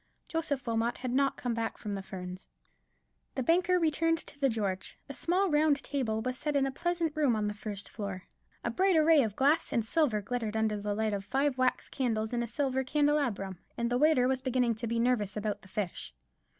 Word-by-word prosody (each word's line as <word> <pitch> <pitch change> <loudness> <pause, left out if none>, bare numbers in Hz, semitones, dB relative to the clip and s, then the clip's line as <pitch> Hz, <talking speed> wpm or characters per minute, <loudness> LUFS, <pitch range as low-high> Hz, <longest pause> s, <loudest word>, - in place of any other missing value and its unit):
Joseph 305 -5 -2
Wilmot 230 0 0
had 250 -1 -3
not 275 +2 +2
come 245 -2 -2
back 225 -1 -2
from 210 - -5
the 195 - -3
Ferns. 185 -1 -8 0.9
The 260 - -1
banker 360 +5 +3
returned 330 0 +2
to 285 - -13
the 275 -1 +3
George. 200 -5 -2
A 280 - -6
small 365 +5 +1
round 295 -1 +3
table 225 -6 -1
was 255 +1 -3
set 300 -1 -2
in 275 -1 +3
a 270 - -1
pleasant 340 +1 -1
room 290 -6 +3
on 210 -1 0
the 210 - -2
first 205 -1 -6
floor; 195 -3 -5 0.4
a - - -1
bright 380 -1 +3
array 315 -1 +6
of 215 -5 -1
glass 285 +6 +2
and 230 - +1
silver 260 -4 +2
glittered 220 +1 -3
under 220 -1 +1
the 205 0 -1
light 220 0 0
of 200 -1 -2
five 270 +6 +1
wax 255 0 +1
candles 220 -3 -1
in 240 - +1
a 235 - -2
silver 265 +1 0
candelabrum; 265 - 0 0.2
and 235 0 -1
the 245 - +2
waiter 295 -4 +4
was 260 0 0
beginning 250 -2 +1
to 225 +2 -5
be 230 +1 0
nervous 230 -4 +1
about 210 -1 -2
the - - -16
fish. 175 - -4
245 Hz, 215 wpm, -31 LUFS, 215-290 Hz, 0.9 s, array